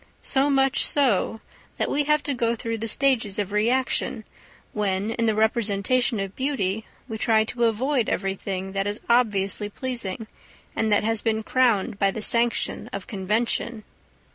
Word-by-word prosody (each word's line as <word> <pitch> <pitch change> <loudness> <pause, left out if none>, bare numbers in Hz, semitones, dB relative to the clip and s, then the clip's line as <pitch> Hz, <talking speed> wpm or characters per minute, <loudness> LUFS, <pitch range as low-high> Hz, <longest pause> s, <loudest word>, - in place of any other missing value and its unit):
So 275 +1 +2
much 270 -1 +3
so, 230 -5 +2 0.4
that - - 0
we 290 0 0
have 300 0 +2
to 285 - -1
go 235 -2 0
through 230 -1 -4
the 225 - -3
stages 230 -4 +2
of 205 -2 -2
reaction 235 +1 0 0.5
when 200 0 -1
in 230 0 -1
the 220 - +2
representation 220 +1 +1
of 195 -1 -4
beauty 220 -7 -1 0.2
we 220 -3 -6
try 220 -1 +3
to 235 +2 -1
avoid 240 +2 +1
everything 195 0 -3
that 195 +1 -1
is 205 +1 -3
obviously 205 -4 +1
pleasing 230 -3 -5 0.5
and 220 -1 0
that 205 - +3
has 225 0 0
been 220 -1 0
crowned 225 -6 +1
by 195 - +3
the 205 - -4
sanction 235 +2 +1
of 200 -1 -5
convention. 220 +2 -1
220 Hz, 160 wpm, -24 LUFS, 205-245 Hz, 0.5 s, much